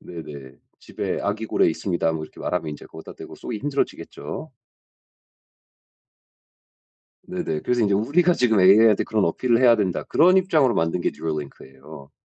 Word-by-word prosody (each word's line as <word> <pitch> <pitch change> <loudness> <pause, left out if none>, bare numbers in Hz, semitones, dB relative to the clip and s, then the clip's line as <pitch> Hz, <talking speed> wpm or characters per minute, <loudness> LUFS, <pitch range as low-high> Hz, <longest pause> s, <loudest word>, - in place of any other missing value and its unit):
네네. 70 -6 -10 0.2
"집에 - - -5
아기 105 +2 -3
고래 - - +2
있습니다." 80 0 -1
뭐 80 -1 -4
이렇게 - - -17
말하면 90 -3 -2
인제 75 - -10
거기다 80 0 -12
대고 - - -11
쏘기 115 - -6
힘들어지겠죠. 140 +3 -4 2.8
네네. 75 - -3
그래서 125 -1 0
인제 100 -3 +2
"우리가 150 - +2
지금 110 - +2
AI한테 105 +3 +5
그런 110 -2 0
어필을 115 +7 +1
해야 120 -2 +6
된다." 95 -5 -1
그런 180 +4 +4
입장으로 155 -9 +2
만든 80 +2 0
게 - - 0
Neuralink예요. 70 -2 -8
100 Hz, 385 characters per minute, -23 LUFS, 80-120 Hz, 2.8 s, 해야